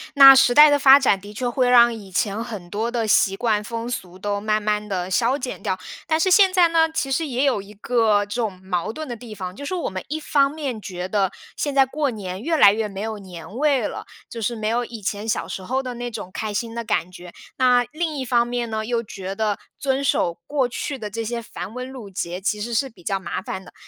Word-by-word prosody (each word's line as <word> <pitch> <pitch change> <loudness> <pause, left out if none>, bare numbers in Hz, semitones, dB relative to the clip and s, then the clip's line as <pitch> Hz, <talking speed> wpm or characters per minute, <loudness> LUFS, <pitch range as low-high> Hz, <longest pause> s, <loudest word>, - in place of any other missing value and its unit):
那 275 -1 +11
时 260 -2 +5
代 300 +3 +9
的 290 0 +3
发 270 0 +8
展 255 -8 +2
的 205 +2 -11
确 245 +4 -2
会 250 +1 +1
让 240 -1 +6
以 210 -4 -10
前 200 +3 -1
很 210 -7 -7
多 220 +5 -2
的 235 -2 -1
习 195 -2 +3
惯 215 -1 +1
风 230 +2 -5
俗 185 -7 -6
都 205 +1 -2
慢 215 0 0
慢 210 0 -1
地 185 -2 -3
消 240 +7 +2
减 255 -6 -6
掉。 185 - -1 0.3
但 315 - +2
是 375 +3 +2
现 385 -1 +6
在 355 -2 +5
呢， 325 -1 +3
其 270 -4 -2
实 320 +4 0
也 255 -1 -1
有 265 -8 +2
一 200 +2 -13
个 215 -1 +2
这 205 - -7
种 200 -5 -3
矛 185 +2 -2
盾 310 +4 -6
的 240 - -5
地 225 -1 -10
方， 185 -2 -6
就 285 - -8
是 370 - -3
我 345 - -2
们 185 0 -5
一 310 +3 -3
方 280 -2 +3
面 280 -7 -5
觉 180 -2 -5
得， 195 -1 +1 0.3
现 285 -2 -2
在 270 -1 +6
过 285 +2 -1
年 195 -5 -6
越 325 +6 0
来 200 -10 +7
越 220 0 -1
没 195 -1 -7
有 220 0 -4
年 185 0 -10
味 285 -2 +2
了， - - -5 0.2
就 230 - -7
是 235 +2 -1
没 215 -1 -3
有 240 +2 0
以 230 -2 -9
前 205 +2 -3
小 225 - -1
时 - - -5
候 260 +8 -2
的 250 -1 -5
那 240 0 -4
种 215 -5 -7
开 215 -1 -4
心 225 +2 -3
的 235 0 -4
感 180 -5 -1
觉。 180 -1 -12 0.2
那 250 -1 +4
另 315 -1 -3
一 265 - -2
方 240 -2 +2
面 240 -1 -2
呢， 220 0 -3
又 235 0 -1
觉 195 -2 -7
得 210 -1 -1 0.2
遵 270 0 0
守 175 -10 +1
过 275 -4 +1
去 270 +3 -4
的 215 -4 -6
这 225 +2 -4
些 235 +1 -3
繁 190 -3 -8
文 250 +1 -6
缛 245 -6 -9
节 180 -1 -4
其 210 +2 -2
实 235 +3 -4
是 265 +4 +1
比 190 -7 -20
较 195 +2 -1
麻 190 - -4
烦 190 - -6
的。 - - -15
230 Hz, 275 characters per minute, -22 LUFS, 205-260 Hz, 0.3 s, 那